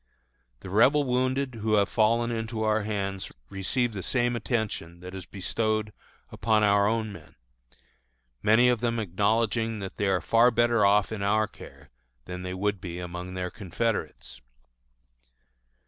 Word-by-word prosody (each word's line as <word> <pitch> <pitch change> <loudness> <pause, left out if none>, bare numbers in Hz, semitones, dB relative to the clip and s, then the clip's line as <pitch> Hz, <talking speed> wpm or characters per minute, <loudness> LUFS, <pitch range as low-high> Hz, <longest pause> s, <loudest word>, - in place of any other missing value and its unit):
The 95 - -8
Rebel 135 +8 +5
wounded 130 +1 0
who 110 0 0
have 100 -1 +3
fallen 115 +2 +2
into 110 -1 -3
our 110 0 +2
hands 100 -2 -3 0.2
receive 115 +5 -1
the 100 - -4
same 120 +5 0
attention 105 -7 -3
that 90 +1 -9
is 95 -1 -8
bestowed 110 +2 -2 0.4
upon 110 -2 +1
our 100 0 +4
own 110 -1 -1
men, 80 -5 -14 1.1
many 110 +4 +5
of 125 -2 +3
them 115 -1 0
acknowledging 110 +3 0
that 95 -2 -7
they 100 - 0
are 95 -2 +2
far 115 +7 +4
better 120 -2 +2
off 100 +1 +4
in 110 -2 -4
our 105 +2 +2
care - - -14 0.3
than 90 0 -6
they 90 0 -5
would 100 0 -1
be 90 -2 -6
among 90 +1 -6
their 90 -1 -3
confederates. 95 - -3
105 Hz, 150 wpm, -27 LUFS, 95-115 Hz, 1.1 s, Rebel